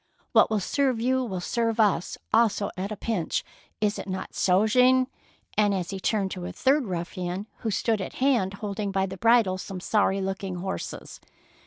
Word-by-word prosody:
" - - -38
What - - +6
will 215 -1 +1
serve 260 +4 0
you 260 +2 +1
will 190 -7 -3
serve 230 +4 -1
us 200 -5 +2 0.2
also 220 -3 +3
at 195 +2 -4
a - - -2
pinch. 200 -5 -2 0.4
Is 210 -1 0
it - - -6
not 190 0 -4
so, 185 +3 +3
Jean 255 +3 +5
I 250 -4 -6
and 205 -1 +3
he 195 +2 -5
turned 195 -1 0
to 180 -2 -5
a - - -5
third 275 -1 +2
ruffian 180 +1 -4
who 225 - -3
stood 215 +1 0
at - - -5
hand, 240 -8 +1
holding 200 0 -3
by 190 0 +1
the 190 0 -7
bridle 225 -3 +4
some 190 0 -6
sorry 195 0 +1
looking 195 -1 -3
horses. 190 +2 -5
200 Hz, 190 wpm, -26 LUFS, 190-230 Hz, 0.4 s, What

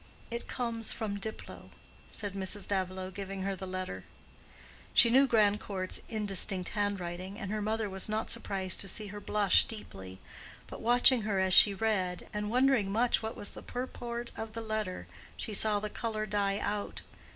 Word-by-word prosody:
"It 235 0 -5
comes 230 -2 -2
from 205 -2 -4
Diplow," 220 +2 -7 0.4
said 205 -3 -1
Mrs. 195 +1 +1
Davilow, 185 -1 -2
giving 195 0 -6
her 195 0 -2
the 190 0 -7
letter. 185 - -5 0.9
She 235 - +7
knew 270 +3 +6
Grandcourt's 205 -4 +1
indistinct 200 -4 0
handwriting, 190 -2 -3
and 200 -4 -5
her 215 0 -2
mother 215 +1 -1
was 190 +1 0
not 215 +1 0
surprised 190 -2 0
to 195 - -2
see 210 +2 0
her 205 - -6
blush 205 -1 +4
deeply; 95 - -9 0.5
but - - -10
watching 245 +1 +6
her 210 -2 -1
as 190 -1 +3
she 200 +1 +9
read, 190 -4 -1
and 210 0 -3
wondering 250 -4 +2
much 235 +4 +2
what 220 0 -5
was 205 - -5
the - - -8
purport 240 -1 -5
of 220 -1 -6
the 230 - -4
letter, 215 -4 -3 0.3
she 215 - -4
saw 210 0 +4
the 210 - -4
color 215 0 -3
die 200 -1 0
out. 205 0 -3
205 Hz, 170 wpm, -31 LUFS, 190-220 Hz, 0.9 s, she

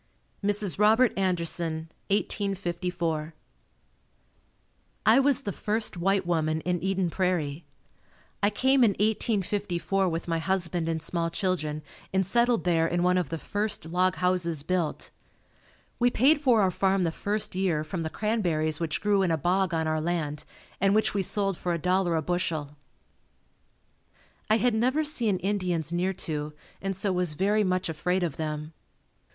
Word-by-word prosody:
Mrs. 205 -2 0
Robert 220 +3 +5
Anderson 170 -3 0 0.2
1854. 175 -5 -2 1.7
I 225 +4 +6
was 275 -1 +3
the 205 - -2
first 215 +2 -2
white 190 +2 +1
woman 160 -2 0
in 175 0 -1
Eden 190 -2 0
Prairie. 170 -4 -1 0.8
I 205 - +4
came 260 +5 +3
in 215 -4 +4
1854 195 -3 0
with 165 0 -4
my 165 -1 0
husband 175 -2 -1
and 160 -1 -2
small 165 0 0
children 160 -4 -1 0.3
and 190 0 +1
settled 235 +3 +2
there 165 -2 +2
in 175 +1 0
one 180 0 +3
of 175 - -3
the 165 - -3
first 205 +2 -2
log 180 +3 +1
houses 175 -4 0
built. 175 -2 -2 0.9
We 245 0 +4
paid 280 +6 +4
for 245 -6 +4
our 190 -2 +3
farm 190 0 +1
the 165 - +1
first 205 +5 -3
year, 180 -5 0
from 165 +3 -4
the 160 - -2
cranberries 170 -8 0
which 165 -2 -2
grew 205 -1 +2
in 185 - +2
a 165 - +1
bog 185 +4 +1
on 160 -1 0
our 155 0 0
land 155 -3 -2 0.3
and 195 +1 +3
which 215 - +2
we 200 - +1
sold 195 -1 -1
for 175 -1 -1
$1.00 180 0 +1
a - - 0
bushel. 155 -4 -2 1.7
I 215 - +5
had 240 +2 +2
never 255 +7 +2
seen 235 -10 +1
Indians 180 -5 -1
near 180 +2 0
to, 150 -1 -3 0.3
and 195 0 -2
so 195 0 -1
was 180 -4 0
very 205 +5 +2
much 185 -1 0
afraid 180 +3 -1
of 165 -5 -2
them. 155 0 -4
180 Hz, 155 wpm, -27 LUFS, 165-205 Hz, 1.7 s, I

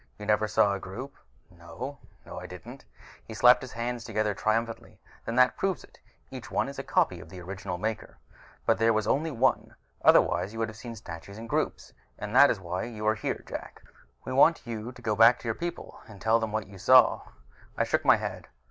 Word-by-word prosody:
You 105 - -8
never 105 0 +2
saw 100 -1 +3
a 100 - -3
group?" 125 +10 -8 0.4
"No. 90 +11 -8 0.3
No, - - -8
I 90 - -8
didn't." 90 -7 -11 0.4
He 110 - -10
slapped 125 +3 +6
his 130 -1 -9
hands 120 0 -3
together 110 -2 -1
triumphantly. 115 +3 -2 0.3
"Then 115 - -3
that 125 0 +4
proves 195 -2 -1
it. - - -19 0.3
Each - - -9
is - - -2
a - - -4
copy - - +1
of - - -12
the 95 - -10
original 90 0 -6
Maker, 110 +3 -4 0.5
but 115 - +2
there 115 0 +4
was 110 -1 0
only 150 +8 +1
one. 130 -2 0 0.3
Otherwise 90 +5 +4
you - - -8
would 115 0 -1
have 110 - -10
seen 115 +1 -8
statues 100 -1 -10
in 115 - -8
groups. 115 - -2 0.2
And 105 +2 -6
that 140 +2 +8
is 110 - 0
why 90 0 -4
you 110 -3 -7
are 110 - +4
here, 110 - -4
Jak: - - -8 0.4
we 130 - -4
want 150 +4 +4
you 115 0 -5
to - - -15
go 110 -1 0
back 115 +3 +7
to - - -9
your 115 - +1
people 170 +8 -7
and 105 -3 -13
tell 115 +2 +3
them 110 -1 -3
what 110 -1 -2
you 100 -1 -13
saw." 130 +6 +6 0.6
I - - +2
shook - - 0
my - - +6
head. - - -6
110 Hz, 215 wpm, -28 LUFS, 100-120 Hz, 0.6 s, that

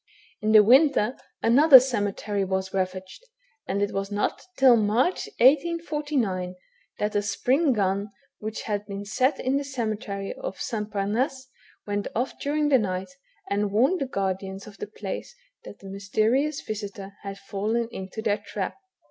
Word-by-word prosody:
In 215 +1 +1
the 215 -1 +9
winter, 260 0 +4 0.3
another 265 +4 +9
cemetery 205 -4 -1
was 190 0 -2
ravaged, 185 - -3 0.4
and 200 +1 0
it 205 - -2
was 195 0 -2
not 205 0 -1 0.2
till 260 -3 +7
March 230 - +1
in 235 - +4
1849, 290 - +1 0.4
that 210 0 -1
a 205 - +3
spring 255 +9 +1
gun 200 -2 0 0.3
which 215 0 -5
had 205 -2 -2
been 200 0 -6
sot 255 +6 +1
in 260 +2 +1
the 285 - -1
cemetery 215 -6 -4
of - - -6
S. - - -5 0.2
Pamasse, 250 +7 -1 0.4
went 205 -1 -2
off 245 +4 -2
during 295 +1 0
the 265 -3 +5
night, 185 0 -3 0.4
and 200 0 0
warned 265 - +2
the 275 - 0
guardians 195 -2 -3
of 210 -2 -13
the - - -4
place 210 - -6 0.3
that - - -10
the 195 - -12
mysterious 215 +9 0
visitor 200 -2 -6
had 195 -1 -6
fallen 210 +4 -2
into* 190 +2 -6
their 210 -2 +1
trap. 205 -2 -5
210 Hz, 155 wpm, -26 LUFS, 200-260 Hz, 0.4 s, the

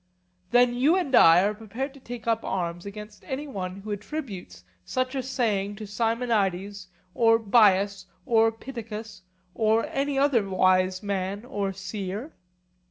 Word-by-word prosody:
Then 245 +2 +4
you 275 +8 +3
and 350 -8 -1
I 165 -5 +8
are 205 +1 +1
prepared 225 +6 -5
to 275 - -14
take 240 -3 -8
up 225 -1 0
arms 175 0 -3
against 210 +1 -10
any 270 +3 -3
one 190 -6 -5
who 215 +1 -7
attributes 205 - -6 0.2
such 255 - -2
a 270 - -1
saying 210 -6 -1
to 215 +1 -7
Simonides 205 -3 -1 0.3
or 225 -1 +4
Bias 200 -3 +3 0.2
or 225 -3 +4
Pittacus, 225 -3 -8 0.3
or 220 +2 +2
any 275 0 -1
other 265 -8 +2
wise 185 0 +2
man 200 +1 -3
or 205 -6 -2
seer? 195 - -6
215 Hz, 145 wpm, -26 LUFS, 195-245 Hz, 0.3 s, I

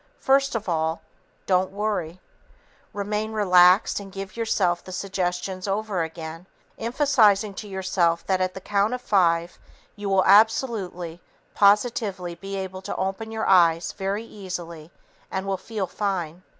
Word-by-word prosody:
First 275 -1 +2
of 220 -2 -3
all, 160 -1 -1 0.4
DON'T 185 0 +2
WORRY. 195 -4 -3 0.7
Remain 210 +2 -3
relaxed 185 -2 +5
and 195 -1 -10
give 195 +1 -7
yourself 195 -6 0
the 185 - -10
suggestions 185 0 -3
over 200 -2 -1
again, 165 +1 -6 0.3
emphasizing 225 -5 +3
to 210 - -8
yourself 185 -3 0
that 185 -1 +1
at 185 0 -1
the 190 - -7
count 205 +5 +1
of 250 - -8
five 170 -4 +1 0.4
you 205 -1 -4
will 190 -1 +3
absolutely, 195 -5 +2 0.3
positively 200 -3 +2
be 195 +3 -7
able 190 -1 -5
to - - -5
open 195 +4 -3
your 220 0 -2
eyes 170 -3 +4
very 195 +2 -3
easily 175 -7 -8 0.4
and 190 0 -3
will 195 0 -1
feel 205 +1 -4
fine. 180 -3 -3
190 Hz, 140 wpm, -24 LUFS, 180-210 Hz, 0.7 s, relaxed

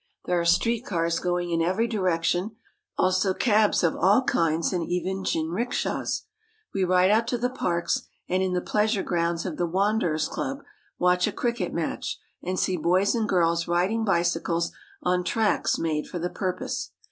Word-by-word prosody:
There 180 -1 +1
are - - -2
street 230 +7 +2
cars 170 -5 0
going 175 -1 -1
in 165 0 +1
every 185 +7 +1
direction; 185 -1 0 0.4
also 185 +1 +2
cabs 215 -5 +3
of 165 - +2
all 205 +8 +4
kinds, 165 -5 +1
and 175 -2 0
even 185 +3 -2
jinrikshas. 180 +10 -1 0.5
We 195 - 0
ride 185 +1 +4
out 225 +2 +3
to 245 - 0
the 250 +1 -1
parks, 170 -9 -1 0.2
and 185 +1 +1
in 190 -1 0
the 180 - 0
pleasure 210 +1 +1
grounds 170 -1 -1
of 175 -5 -4
the 175 - 0
Wanderers' 185 -4 +1
Club 275 +1 -4 0.3
watch 180 0 +3
a - - -1
cricket 240 0 -2
match, - - -3 0.2
and 185 +1 -3
see 185 0 +1
boys 185 +5 +2
and 225 -3 -1
girls 170 -2 +2
riding 185 +6 +1
bicycles 170 -3 +1 0.3
on 180 0 +2
I - - -1
tracks 220 +3 +1
made 155 -2 -1
for - - -5
the 175 +1 -3
purpose. 185 -2 -3
180 Hz, 170 wpm, -26 LUFS, 170-210 Hz, 0.5 s, all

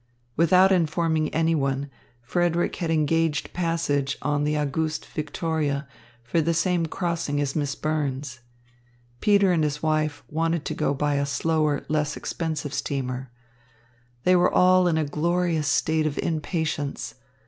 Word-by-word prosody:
Without 180 +4 +5
informing 160 -3 +1
anyone, 145 -4 0 0.4
Frederick 175 +5 0
had 170 - -2
engaged 160 0 +1
passage 165 -5 0
on 145 0 0
the 150 0 0
Auguste 155 +2 -1
Victoria 150 -2 -2 0.4
for 140 +8 +1
the 165 +1 0
same 175 0 +1
crossing 170 -4 -2
as 140 -1 -1
Miss 145 -3 -1
Burns. 140 -4 -2 0.8
Peter 200 -2 +4
and 165 -3 +2
his 150 0 -2
wife 155 -1 0
wanted 165 0 -1
to - - -2
go 150 -2 0
by 145 +1 0
a 140 - +1
slower, 155 0 0
less 150 -1 -1
expensive 155 -3 -3
steamer. 130 -2 -3 0.9
They 185 - +5
were 175 - +4
all 185 0 +5
in 165 -2 +2
a 155 - +1
glorious 165 +1 0
state 155 +1 +2
of 145 - -4
impatience. 160 -3 -2
155 Hz, 135 wpm, -25 LUFS, 145-165 Hz, 0.9 s, Without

